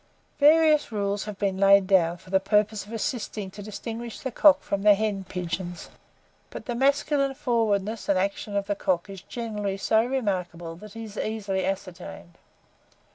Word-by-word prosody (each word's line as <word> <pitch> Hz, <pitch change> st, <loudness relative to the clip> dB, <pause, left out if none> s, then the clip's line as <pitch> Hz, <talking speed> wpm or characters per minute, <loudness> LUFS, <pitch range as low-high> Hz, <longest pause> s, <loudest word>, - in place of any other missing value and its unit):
Various 305 Hz, -1 st, +5 dB
rules 200 Hz, -1 st, -1 dB
have 210 Hz, -2 st, -7 dB
been 195 Hz, -2 st, -1 dB
laid 195 Hz, 0 st, +6 dB
down 175 Hz, -3 st, +3 dB
for 185 Hz, +1 st, -16 dB
the 190 Hz, -, +4 dB
purpose 210 Hz, +1 st, +1 dB
of -, -, -12 dB
assisting 215 Hz, -3 st, -3 dB
to 205 Hz, -, -10 dB
distinguish 225 Hz, +3 st, -6 dB
the 260 Hz, -, -4 dB
cock 295 Hz, +4 st, +6 dB
from 200 Hz, -, -2 dB
the 205 Hz, 0 st, +6 dB
hen 200 Hz, -2 st, -2 dB
pigeon; 180 Hz, 0 st, -4 dB, 0.7 s
but -, -, -8 dB
the 240 Hz, -, -3 dB
masculine 275 Hz, +2 st, +1 dB
forwardness 225 Hz, -6 st, 0 dB
and 195 Hz, -, +3 dB
action 200 Hz, +2 st, -2 dB
of 200 Hz, 0 st, 0 dB
the 205 Hz, -, 0 dB
cock 185 Hz, -1 st, -1 dB
is 195 Hz, -2 st, -9 dB
generally 210 Hz, -4 st, -4 dB
so 220 Hz, +3 st, +2 dB
remarkable, 185 Hz, -9 st, -3 dB
that 210 Hz, +2 st, -12 dB
he 225 Hz, -, -7 dB
is 215 Hz, -1 st, -10 dB
easily 195 Hz, -4 st, -2 dB
ascertained. 180 Hz, -2 st, -6 dB
205 Hz, 170 wpm, -26 LUFS, 190-225 Hz, 0.7 s, laid